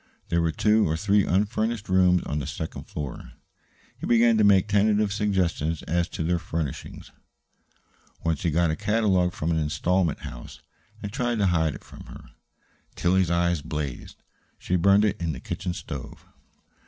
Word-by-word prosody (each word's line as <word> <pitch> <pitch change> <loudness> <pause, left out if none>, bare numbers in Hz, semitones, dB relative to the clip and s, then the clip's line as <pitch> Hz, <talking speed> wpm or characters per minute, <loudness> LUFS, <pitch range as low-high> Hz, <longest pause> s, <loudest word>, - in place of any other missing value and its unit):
There 85 0 +2
were 85 -1 +1
two 105 +3 +2
or 80 - 0
three 100 +3 +2
unfurnished 105 +3 0
rooms 90 -1 +3
on 75 - -3
the 70 - -5
second 80 - -6
floor. 70 -4 -7 0.7
He - - -5
began 115 -1 +4
to - - +4
make 100 -1 +5
tentative 105 0 +2
suggestions 90 -6 0
as 85 +1 -1
to - - -4
their 85 +2 0
furnishing. 80 -4 -5 1.2
Once 80 -3 0
he 85 - +1
got 85 +1 +2
a - - -1
catalogue 95 -2 +1
from 85 -2 -2
an 80 - +1
installment 85 +2 0
house, - - -9 0.4
and 100 0 -5
tried 120 -1 -1
to 100 - +2
hide 80 -4 +1
it - - -11
from - - -13
her. - - -13 0.6
Tillie's 90 0 +2
eyes 85 -2 +1
blazed. 75 -4 -6 0.3
She 90 - -2
burned 100 +4 +4
it 100 -4 -1
in 80 -2 -1
the 65 - -7
kitchen 90 +6 -4
stove. 70 -7 -8
90 Hz, 165 wpm, -25 LUFS, 80-100 Hz, 1.2 s, make